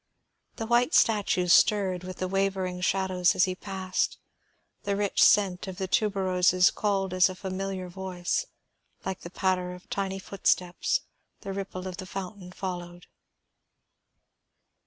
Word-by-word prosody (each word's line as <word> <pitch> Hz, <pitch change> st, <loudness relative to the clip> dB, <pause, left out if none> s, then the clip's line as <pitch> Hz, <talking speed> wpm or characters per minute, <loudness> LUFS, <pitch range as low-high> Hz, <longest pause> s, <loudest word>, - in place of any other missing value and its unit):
The 225 Hz, -, -4 dB
white 240 Hz, +5 st, +3 dB
statues 195 Hz, -5 st, +3 dB
stirred 190 Hz, -4 st, +3 dB
with 185 Hz, 0 st, -7 dB
the 185 Hz, -, -2 dB
wavering 190 Hz, -1 st, -1 dB
shadows 185 Hz, -1 st, +2 dB
as -, -, +4 dB
he 185 Hz, -2 st, +1 dB
passed; 190 Hz, -1 st, -2 dB, 0.6 s
the 200 Hz, 0 st, -1 dB
rich 205 Hz, 0 st, 0 dB
scent 195 Hz, -3 st, +4 dB
of 185 Hz, -1 st, -6 dB
the 190 Hz, -, -2 dB
tuberoses 185 Hz, -3 st, +3 dB
called 195 Hz, -3 st, 0 dB
as 185 Hz, +1 st, +5 dB
a 185 Hz, -, -6 dB
familiar 190 Hz, 0 st, -4 dB
voice; 180 Hz, -1 st, -3 dB, 0.6 s
like 190 Hz, -1 st, -4 dB
a 170 Hz, -, -7 dB
patter 180 Hz, -1 st, 0 dB
of 180 Hz, 0 st, -13 dB
tiny 195 Hz, -1 st, -2 dB
footsteps 195 Hz, -, 0 dB, 0.4 s
the 195 Hz, -2 st, -5 dB
ripple 190 Hz, -1 st, -5 dB
of 185 Hz, -, -6 dB
the 185 Hz, -2 st, -7 dB
fountain 190 Hz, -1 st, -7 dB
followed. 175 Hz, -2 st, -6 dB
190 Hz, 135 wpm, -27 LUFS, 180-195 Hz, 0.6 s, as